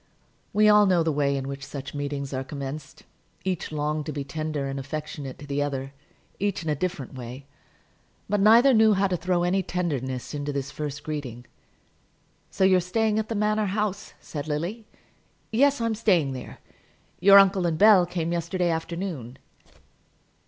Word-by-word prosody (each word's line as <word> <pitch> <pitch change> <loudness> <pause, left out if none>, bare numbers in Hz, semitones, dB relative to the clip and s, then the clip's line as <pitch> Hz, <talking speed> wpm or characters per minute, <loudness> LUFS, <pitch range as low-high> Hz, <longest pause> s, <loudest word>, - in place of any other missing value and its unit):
We 210 +1 +4
all 210 -1 +6
know 180 -3 +3
the 160 - +1
way 140 -1 +1
in 135 0 -4
which 140 0 -6
such 140 0 -7
meetings 145 -1 -4
are 130 0 -2
commenced. 140 +1 -7 0.4
Each 185 -4 -2
longed 150 0 -2
to - - -2
be 145 -1 -4
tender 155 0 -3
and 135 0 -4
affectionate 145 -1 -6
to 145 - -10
the 145 0 -2
other, 135 -1 -3 0.5
each 200 -3 -1
in 160 - -3
a - - +1
different 165 -4 -4
way; 130 +1 -8 0.8
but 205 - 0
neither 230 +6 +6
knew 220 -1 +5
how 195 +1 +2
to 185 -2 0
throw 175 0 0
any 185 +2 +2
tenderness 140 -10 -3
into 145 0 -3
this 140 -1 -4
first 150 -1 -5
greeting. 130 -6 -5 1.0
"So - - -1
you're 190 -1 +5
staying 215 +4 0
at 220 - -3
the 225 - -2
Manor 210 0 +1
House," 210 0 -3
said 150 -1 -7
Lily. 175 +9 -3 0.6
"Yes; 280 +4 +3
I'm 230 -1 0
staying 185 -11 +2
there. 130 - -8 0.6
Your 195 +2 +8
uncle 195 -2 +5
and 160 -2 -1
Bell 200 -2 +6
came 170 -2 -2
yesterday 175 +1 0
afternoon." 160 -6 -4
160 Hz, 170 wpm, -25 LUFS, 140-195 Hz, 1.0 s, Your